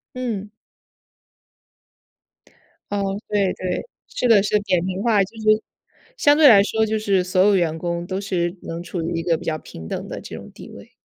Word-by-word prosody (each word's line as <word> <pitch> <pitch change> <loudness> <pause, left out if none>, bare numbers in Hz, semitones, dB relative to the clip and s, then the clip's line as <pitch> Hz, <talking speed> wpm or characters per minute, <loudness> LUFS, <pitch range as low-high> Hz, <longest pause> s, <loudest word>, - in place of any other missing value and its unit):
嗯。 220 -5 -4 2.4
噢， 205 - 0 0.3
对 200 -3 +1
对， 185 - -3 0.2
这 250 - -2
个 210 -4 +6
是 210 +1 +2
扁 185 -4 0
平 185 0 -3
化， 215 -3 +3
就 195 +4 -7
是 215 0 +3 0.5
相 290 -11 +4
对 300 -2 +7
来 205 -4 +8
说 220 +1 +1
就 220 0 -1
是 200 -3 +1
所 185 +1 0
有 200 +1 +5
员 165 -3 +1
工 170 0 -3
都 190 +1 -3
是 180 -2 -2
能 165 +1 -6
处 175 0 -5
于 170 +1 -3
一 - - -4
个 165 -1 +1
比 - - -11
较 155 - -1
平 80 - -11
等 - - -5
的 - - -6
这 - - -8
种 - - -11
地 - - -12
位。 - - -13
195 Hz, 205 characters per minute, -22 LUFS, 175-215 Hz, 2.4 s, 来